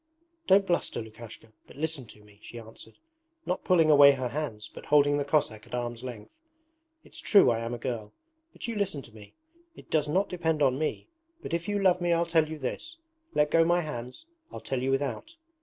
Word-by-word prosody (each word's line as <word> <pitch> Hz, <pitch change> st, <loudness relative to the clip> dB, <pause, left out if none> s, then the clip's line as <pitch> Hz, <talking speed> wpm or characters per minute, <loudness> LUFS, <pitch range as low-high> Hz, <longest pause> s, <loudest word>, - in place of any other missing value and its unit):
'Don't 195 Hz, +1 st, +5 dB
bluster, 175 Hz, -2 st, -1 dB
Lukashka, 110 Hz, 0 st, -11 dB
but -, -, -15 dB
listen 150 Hz, -3 st, -3 dB
to 105 Hz, 0 st, -14 dB
me,' 105 Hz, -1 st, -21 dB
she 120 Hz, -, -11 dB
answered, 110 Hz, 0 st, -13 dB, 0.5 s
not 180 Hz, -, -2 dB
pulling 165 Hz, -4 st, +4 dB
away 140 Hz, -1 st, +8 dB
her 130 Hz, -2 st, -3 dB
hands 120 Hz, -6 st, -4 dB
but -, -, -13 dB
holding 145 Hz, 0 st, +4 dB
the -, -, 0 dB
Cossack 140 Hz, -8 st, -1 dB
at -, -, -5 dB
arm's 120 Hz, 0 st, -4 dB
length. 120 Hz, -5 st, -8 dB, 0.7 s
'It's -, -, -9 dB
true 200 Hz, -, +5 dB
I 115 Hz, -, 0 dB
am 115 Hz, +1 st, -4 dB
a -, -, -6 dB
girl, 115 Hz, -3 st, -5 dB, 0.4 s
but -, -, -8 dB
you 230 Hz, -, -3 dB
listen 195 Hz, -9 st, -2 dB
to 115 Hz, -, -14 dB
me! 105 Hz, -2 st, -15 dB, 0.4 s
It -, -, -16 dB
does 150 Hz, -2 st, +2 dB
not 190 Hz, +7 st, +1 dB
depend 160 Hz, -4 st, -1 dB
on 130 Hz, 0 st, +2 dB
me, 155 Hz, -, -3 dB, 0.4 s
but -, -, -6 dB
if 170 Hz, +1 st, -2 dB
you 205 Hz, -, 0 dB
love 185 Hz, -2 st, +3 dB
me 175 Hz, -1 st, +2 dB
I'll 170 Hz, 0 st, +2 dB
tell 165 Hz, -2 st, +2 dB
you 160 Hz, -, -5 dB
this. 150 Hz, -, -5 dB, 0.4 s
Let 150 Hz, 0 st, +2 dB
go 165 Hz, -, +5 dB
my 175 Hz, +1 st, +2 dB
hands, 130 Hz, -, -6 dB, 0.3 s
I'll -, -, -7 dB
tell 130 Hz, -2 st, -3 dB
you 130 Hz, -, -1 dB
without. 140 Hz, -, -2 dB
145 Hz, 210 wpm, -28 LUFS, 120-170 Hz, 0.7 s, away